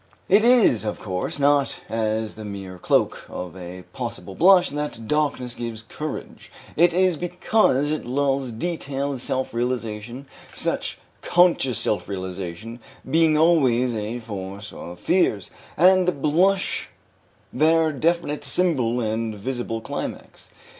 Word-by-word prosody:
It 205 +3 +5
is, 235 - +5
of 105 - -3
course, 95 +5 -3
not 145 -1 +2
as 110 -1 -1
the 110 - -9
mere 95 -3 -7
cloak - - +1
of 90 -1 -6
a 90 0 -8
possible 115 -5 -6
blush 180 - +5
that 145 -6 -5
darkness 140 -4 0
gives 115 -2 -6
courage; 150 +7 -7 0.2
it 175 +2 +5
is 180 -1 +2
because 175 -4 +1
it 155 - -2
lulls 135 +1 0
detailed 140 -1 -3
self 130 -1 -2
realization, 120 +1 -3 0.3
such - - -2 0.2
conscious 170 -9 +3
self 105 - -1
realization 95 +4 -6 0.3
being 160 -1 +3
always 130 -7 +3
a 110 +3 -3
source 100 -2 -7
of 90 0 -9
fears, 110 - +1 0.3
and 185 +2 +5
the - - +4
blush 180 +7 +1 0.6
their 160 +1 +3
definite 155 0 0
symbol 130 -5 +1
and 110 0 -2
visible 115 +1 -4
climax. - - -7
130 Hz, 125 wpm, -23 LUFS, 110-160 Hz, 0.6 s, It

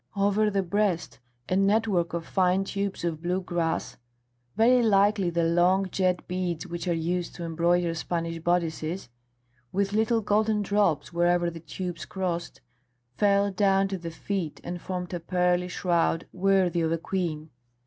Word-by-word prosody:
Over 205 +2 +2
the 195 -1 0
breast 190 -2 -1 0.3
a 185 - 0
network 195 -3 +2
of 165 -1 -4
fine 185 0 +2
tubes 200 -1 -3
of 165 -2 -2
blue 180 +2 0
glass, 175 -3 -2 0.6
very 245 +3 +5
like 205 -1 +4
the 175 -3 0
long 180 +3 +3
jet 185 -2 0
beads 180 -2 -2
which 170 0 -5
are 175 - +2
used 175 +2 -2
to 175 - -6
embroider 170 +1 +1
Spanish 165 0 -3
bodices, 170 -1 -1 0.6
with 200 +1 0
little 225 +2 +2
golden 210 0 +1
drops 190 -7 +1
wherever 175 0 +2
the 165 - -8
tubes 175 +2 -6
crossed, 175 -3 -4 0.5
fell 200 +2 +3
down 195 0 +2
to 190 - -2
the 170 -1 -5
feet 165 -1 -4
and 175 0 -5
formed 180 -1 -5
a 175 - -2
pearly 180 +1 +1
shroud 170 -2 0
worthy 185 -2 +2
of 160 0 0
a 165 - +1
queen. 160 -3 -3
180 Hz, 155 wpm, -27 LUFS, 170-195 Hz, 0.6 s, very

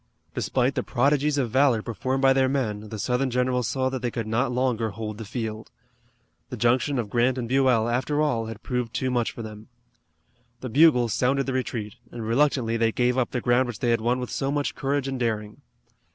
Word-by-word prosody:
Despite 130 +1 0
the - - -1
prodigies 145 +3 +1
of 125 -5 0
valor 130 -4 +3
performed 130 +4 -2
by 135 0 +6
their 130 -1 +2
men, 110 -6 -2
the 110 - -6
Southern 125 +5 0
generals 125 -1 0
saw 130 -1 0
that 130 -1 -4
they 120 - -1
could 115 -1 -4
not 120 +4 0
longer 125 -3 0
hold 110 0 -6
the 110 - -6
field. 110 0 -5 0.8
The - - -6
junction 130 +3 +2
of 120 -3 -1
Grant 125 +2 +2
and 120 -2 -3
Buell, 130 -3 +3
after 130 +5 0
all, 120 -7 +1
had 110 -1 -8
proved 125 -2 -3
too 130 -1 0
much 120 -2 +1
for 115 - -8
them. 110 0 -9 0.9
The 130 - -5
bugles 125 -3 +4
sounded 135 +2 +1
the 135 - -2
retreat, 115 -5 -3
and 115 -2 -6
reluctantly 120 -1 +1
they 115 0 +2
gave 125 0 +1
up 130 -2 +1
the 125 - -3
ground 125 +2 +2
which 120 -4 -5
they 120 - 0
had 115 -1 +1
won 120 +3 +1
with 125 - -5
so 135 0 -1
much 145 0 -1
courage 140 0 -1
and 135 -1 -3
daring. 105 -3 -2
125 Hz, 210 wpm, -25 LUFS, 115-130 Hz, 0.9 s, by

